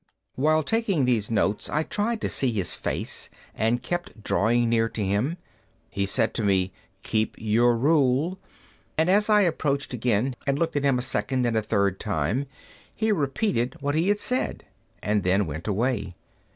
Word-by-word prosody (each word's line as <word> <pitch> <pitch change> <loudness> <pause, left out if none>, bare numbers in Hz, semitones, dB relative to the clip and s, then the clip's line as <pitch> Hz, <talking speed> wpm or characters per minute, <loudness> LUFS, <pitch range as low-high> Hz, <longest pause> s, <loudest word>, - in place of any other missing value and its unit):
While 155 +3 +2
taking 200 - +1
these 115 -5 +1
notes 105 -2 0
I 155 - 0
tried 215 +6 -1
to - - 0
see 130 -3 0
his 100 -6 -1
face, - - -2 0.2
and 115 +3 0
kept 175 -7 -4
drawing 120 +3 +2
near 115 -1 +2
to 105 -3 -3
him. 110 - 0 0.5
He 100 0 -1
said 115 +2 +1
to 115 - -2
me, 95 -2 +2 0.3
"Keep 110 0 -1
your 115 +2 +2
rule." 145 +5 +2 0.6
And 160 +3 +3
as 210 +2 +3
I 210 -1 +6
approached 145 -7 0
again, 125 +1 0
and 140 0 +2
looked 165 0 -1
at 145 - 0
him 135 -2 +3
a 125 - -1
second 130 0 0
and 120 -1 0
a 110 - +2
third 100 -3 0
time, 105 - -1 0.5
he 220 0 +1
repeated 140 - 0
what 145 0 -1
he 160 +4 +1
had 205 0 +3
said 255 +4 -1 0.4
and 105 0 +1
then 95 +2 +2
went 80 +3 -6
away. 105 -3 -1
125 Hz, 175 wpm, -25 LUFS, 105-155 Hz, 0.6 s, I